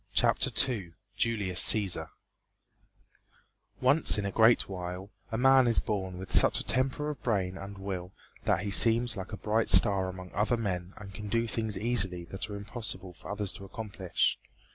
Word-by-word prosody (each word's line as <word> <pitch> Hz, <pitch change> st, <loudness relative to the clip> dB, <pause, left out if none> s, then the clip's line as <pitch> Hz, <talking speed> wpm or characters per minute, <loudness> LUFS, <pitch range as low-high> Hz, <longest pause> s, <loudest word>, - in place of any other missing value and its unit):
CHAPTER -, -, +3 dB, 0.2 s
II 100 Hz, -10 st, -5 dB, 0.2 s
JULIUS 100 Hz, -6 st, +2 dB
CÆSAR 95 Hz, -7 st, +3 dB, 1.7 s
Once 135 Hz, +2 st, +4 dB
in 105 Hz, -, -2 dB
a 100 Hz, -, -2 dB
great 115 Hz, +3 st, +4 dB
while 90 Hz, +1 st, -7 dB, 0.2 s
a 110 Hz, -, -2 dB
man 135 Hz, 0 st, +5 dB
is 115 Hz, -, +2 dB
born 95 Hz, -3 st, -3 dB
with 95 Hz, 0 st, -8 dB
such -, -, +5 dB
a -, -, -3 dB
temper 135 Hz, +4 st, 0 dB
of 140 Hz, -6 st, -10 dB
brain 95 Hz, -6 st, -1 dB
and 95 Hz, +1 st, -9 dB
will 95 Hz, -2 st, -6 dB, 0.3 s
that -, -, +1 dB
he 100 Hz, 0 st, -4 dB
seems 115 Hz, +3 st, +3 dB
like 95 Hz, 0 st, -7 dB
a 105 Hz, -, -6 dB
bright 110 Hz, +2 st, -1 dB
star 95 Hz, -4 st, +4 dB
among 90 Hz, 0 st, -9 dB
other 110 Hz, +4 st, 0 dB
men 95 Hz, -4 st, -4 dB
and 100 Hz, -2 st, -11 dB
can 105 Hz, +2 st, -7 dB
do 115 Hz, +3 st, 0 dB
things 110 Hz, -2 st, -1 dB
easily 100 Hz, -7 st, 0 dB
that 95 Hz, +3 st, -5 dB
are 105 Hz, -, -6 dB
impossible 100 Hz, -3 st, -6 dB
for 80 Hz, -, -13 dB
others 105 Hz, -1 st, -3 dB
to 100 Hz, -, -10 dB
accomplish. 100 Hz, -2 st, -2 dB
100 Hz, 175 wpm, -29 LUFS, 95-115 Hz, 1.7 s, man